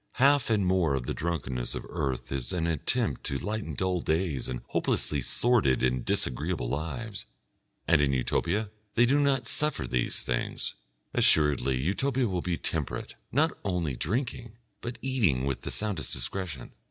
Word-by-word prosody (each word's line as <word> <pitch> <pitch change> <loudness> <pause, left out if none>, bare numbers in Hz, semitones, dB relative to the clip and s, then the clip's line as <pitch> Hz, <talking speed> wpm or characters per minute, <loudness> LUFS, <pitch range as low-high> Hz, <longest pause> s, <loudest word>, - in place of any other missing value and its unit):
Half 140 0 +4
and 105 -4 +3
more 90 -6 +3
of 65 -3 -2
the - - -1
drunkenness 65 -7 -2
of - - -5
earth 65 -3 -2
is 65 -3 -2
an 85 -2 0
attempt 85 - 0
to 70 - 0
lighten 110 +7 -3
dull 95 -1 +1
days 80 -6 0
and 60 -1 -3
hopelessly 75 -2 0
sordid 70 - +2
and 65 -1 +2
disagreeable - - -1
lives, 95 - -4 0.6
and 80 -3 +5
in 70 -1 +3
Utopia 85 - 0 0.2
they 120 - +6
do 140 +4 +4
not 135 -4 +2
suffer 150 +4 -1
these 60 -1 -1
things. - - -2 0.4
Assuredly 70 -4 +3
Utopia 125 - +1
will 90 -3 -1
be 85 -1 -1
temperate, 80 -4 -2 0.2
not 155 +5 +3
only 90 -8 -1
drinking, 120 - -2 0.2
but 120 +1 -5
eating 105 - +2
with 70 -2 -1
the - - -4
soundest 105 -7 -1
discretion. 70 +1 -3
85 Hz, 155 wpm, -29 LUFS, 70-115 Hz, 0.6 s, they